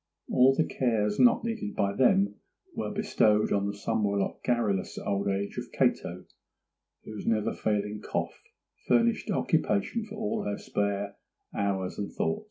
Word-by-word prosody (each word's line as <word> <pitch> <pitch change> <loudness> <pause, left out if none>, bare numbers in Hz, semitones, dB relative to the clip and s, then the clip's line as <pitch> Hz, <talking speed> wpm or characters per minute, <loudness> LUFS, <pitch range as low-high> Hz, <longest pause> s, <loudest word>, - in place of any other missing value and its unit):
All 130 +2 +5
the 160 - +2
cares 105 -5 0
not 240 -1 +5
needed 225 -2 -3
by 100 0 +1
them 100 -5 +3 0.4
were - - -3
bestowed 105 0 +2
on 100 0 +1
the 100 - -3
somewhat 100 -1 -1
garrulous 110 -6 0
old 100 0 -1
age 100 0 -2
of - - -8
Cato, - - 0 0.8
whose 110 -2 -8
never 110 -2 +1
failing 105 0 -1
cough - - -3 0.5
furnished 115 -1 +2
occupation 105 - +1
for 215 0 -9
all 215 0 -2
her 100 - -2
spare 100 0 -2 0.4
hours 95 -2 -1
and 100 - -3
thought. 205 0 -1
105 Hz, 145 wpm, -28 LUFS, 100-125 Hz, 0.8 s, All